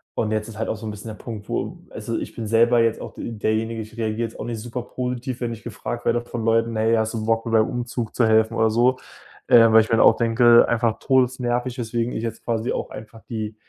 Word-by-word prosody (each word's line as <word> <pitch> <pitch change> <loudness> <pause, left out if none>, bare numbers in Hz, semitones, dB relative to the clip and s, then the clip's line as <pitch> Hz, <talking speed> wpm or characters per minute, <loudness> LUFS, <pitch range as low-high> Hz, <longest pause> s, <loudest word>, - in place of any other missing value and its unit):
und 110 -1 -1
jetzt 110 0 -1
ist 110 -2 -10
halt 110 - -2
auch - - -1
so 110 +1 -9
'n 110 - -3
bisschen 105 +2 -9
der 110 - -7
Punkt, 110 -3 -7
wo - - -3
also, - - -4
ich - - -6
bin 115 -2 -5
selber 115 +2 +4
jetzt 115 -1 +1
auch - - -8
de - - -6
derjenige, 110 +1 -1
ich 110 +2 -11
reagiere 110 0 -2
jetzt 115 - -14
auch - - -4
nicht 115 -2 -4
super 120 +2 -5
positiv, 125 0 -4
wenn 120 -1 -2
ich 115 - -11
gefragt 120 +1 -6
werde 120 0 +2
von 120 -1 -6
Leuten: 115 0 +2
„Hey, 110 +1 +2
hast 110 0 0
du 110 -1 -3
Bock 115 0 +1
mir 115 - -3
beim 110 -1 +4
Umzug 120 -2 -4
zu 120 - +3
helfen“, 110 +1 +3
oder 110 0 +3
so. 120 +4 +2 0.5
Ähm, 115 -2 +7
weil 110 - +8
ich 110 - -4
mir 115 - +3
dann - - +5
auch 115 - +7
denke 120 0 +5
einfach 115 -1 0
todesnervig, 125 -1 0
weswegen 120 0 -2
ich 110 - -4
jetzt 115 - -5
quasi 115 0 -1
auch - - -3
einfach 110 +1 -10
die 110 -2 -4
115 Hz, 260 wpm, -22 LUFS, 110-120 Hz, 0.5 s, weil